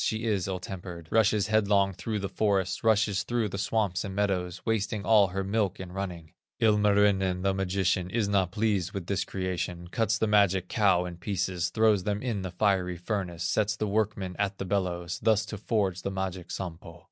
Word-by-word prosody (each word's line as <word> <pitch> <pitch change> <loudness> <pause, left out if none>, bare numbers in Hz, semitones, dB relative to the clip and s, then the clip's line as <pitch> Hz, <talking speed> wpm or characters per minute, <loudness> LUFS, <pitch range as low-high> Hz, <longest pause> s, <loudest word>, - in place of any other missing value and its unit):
she 110 0 -1
is 105 -6 0
ill 95 -1 -2
tempered, 90 -3 -8
Rushes 110 -2 +3
headlong 100 -2 +2
through 110 +4 -3
the 100 -1 -2
forest, 95 -2 0
Rushes 105 -3 +3
through 115 +1 -1
the 100 - -5
swamps 100 -4 0
and 95 -2 -5
meadows, 95 -3 -1
Wasting 105 -2 -1
all 105 -3 +6
her 95 +2 -3
milk 100 -1 0
in 95 -2 -7
running. 90 -4 -5 0.3
Ilmarinen, 100 -3 +3
the 95 0 +2
magician, 95 -1 0
Is 110 +1 0
not 100 -3 +2
pleased 100 -4 0
with 95 -3 -4
this 100 +2 -1
creation, 90 -2 -4
Cuts 110 0 +1
the 110 - +1
magic 100 -4 +3
cow 95 -7 +3
in 90 -1 -7
pieces, 90 -1 -2
Throws 110 -4 +3
them 105 +1 -1
in 115 -6 -2
the 95 - -4
fiery 90 -1 +1
furnace, 90 -2 -3
Sets 105 +2 +1
the 110 - -2
workmen 100 -3 -1
at 100 -1 0
the 95 - -4
bellows, 90 -3 -2
Thus 110 -1 +3
to 110 0 -6
forge 100 -5 0
the 100 - -3
magic 95 -2 -4
Sampo. 85 -2 -7
100 Hz, 190 wpm, -28 LUFS, 90-105 Hz, 0.3 s, all